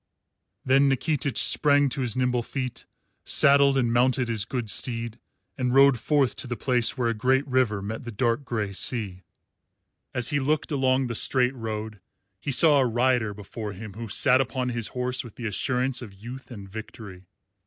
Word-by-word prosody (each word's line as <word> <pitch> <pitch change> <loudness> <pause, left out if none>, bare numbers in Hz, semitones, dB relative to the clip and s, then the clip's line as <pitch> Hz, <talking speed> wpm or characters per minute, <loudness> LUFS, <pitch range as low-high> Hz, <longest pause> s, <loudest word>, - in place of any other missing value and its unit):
Then 135 +2 +4
Nikitich 135 -1 -1
sprang 145 -1 +4
to 135 +1 -3
his 120 -4 -1
nimble 125 -1 0
feet, 130 +1 -6 0.4
saddled 140 -1 +5
and 120 -3 +1
mounted 125 +1 +1
his 110 -3 -2
good 120 -1 -4
steed, 115 +1 -1 0.4
and 125 0 0
rode 135 -2 +5
forth 140 0 +1
to - - -7
the 120 - -3
place 125 +1 0
where 120 -2 0
a - - 0
great 130 +5 +1
river 125 -6 0
met 110 +4 -6
the 120 - -7
dark 115 +4 -1
grey 110 -6 -3
sea. 100 -3 -2 0.9
As 125 -1 +1
he 145 - 0
looked 150 +4 -1
along 130 -2 +1
the 120 - -4
straight 125 +2 +2
road 110 -3 -6 0.4
he 140 - -4
saw 145 +2 +5
a 130 - +3
rider 120 -2 +1
before 105 +1 -7
him 105 +1 -9
who 115 +2 -7
sat 130 +4 +4
upon 130 -1 -3
his 115 -2 -3
horse 125 0 -1
with 120 - -13
the 120 - -8
assurance 125 +4 -1
of 105 -5 -10
youth 125 +8 -10
and 100 -6 -10
victory. 100 -3 -10
125 Hz, 180 wpm, -25 LUFS, 110-130 Hz, 0.9 s, saddled